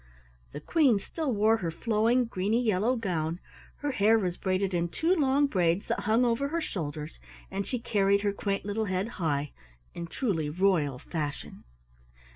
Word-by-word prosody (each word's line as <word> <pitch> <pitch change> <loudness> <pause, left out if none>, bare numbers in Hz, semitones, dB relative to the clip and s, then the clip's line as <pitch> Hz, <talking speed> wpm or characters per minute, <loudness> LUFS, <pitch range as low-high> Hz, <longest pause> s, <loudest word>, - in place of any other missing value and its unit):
The - - -6
Queen 280 -10 +3
still 300 +8 -3
wore 220 +1 +3
her 175 -6 -3
flowing 225 +8 +1
greeny 210 +1 0
yellow 225 +1 +1
gown, 175 -7 -2 0.4
her 290 0 -1
hair 225 -2 +4
was 180 -5 -1
braided 190 0 -1
in 170 -1 0
two 330 - +1
long 285 -4 +3
braids 180 -6 +1
that - - -1
hung 225 +4 +2
over 240 +4 +1
her 330 +4 -1
shoulders, 155 - -5 0.3
and 195 0 -3
she 250 - -1
carried 200 -4 +2
her 205 -1 0
quaint 200 -1 -2
little 215 +2 -1
head 185 +1 -1
high, 145 -3 0 0.4
in 170 - -6
truly 165 - -1
royal 160 -5 +1
fashion. 150 +1 -5
200 Hz, 165 wpm, -28 LUFS, 175-235 Hz, 0.4 s, hair